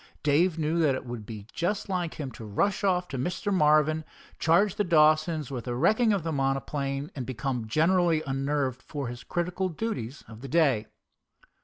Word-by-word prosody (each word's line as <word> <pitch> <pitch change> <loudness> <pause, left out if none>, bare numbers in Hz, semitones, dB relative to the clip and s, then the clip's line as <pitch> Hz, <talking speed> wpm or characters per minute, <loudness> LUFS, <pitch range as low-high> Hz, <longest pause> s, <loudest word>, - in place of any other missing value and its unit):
Dave 160 +4 +3
knew 160 +1 0
that 150 -5 +3
it - - -6
would 120 -4 -7
be 105 -3 -8
just 200 +6 -1
like 180 -4 -2
him 140 -4 -5
to 115 - -10
rush 150 - 0
off 180 -2 +2
to 135 - -4
Mr. 180 +8 -1
Marvin, 155 -2 +3 0.4
charge 175 +5 +3
the 210 - 0
Dawsons 155 -3 +3
with 125 -3 -5
the 120 -1 -2
wrecking 220 - +3
of 200 -5 0
his 165 -1 -2
monoplane, 135 +1 -1
and 130 - -3
become 125 -1 -3
generally 165 +4 +2
unnerved 135 -1 -1
for 140 -3 -5
his 120 0 -8
critical 180 +2 -2
duties 155 - -4
of 110 0 -12
the 135 - -7
day. 135 -8 +2
150 Hz, 180 wpm, -27 LUFS, 130-175 Hz, 0.4 s, Dave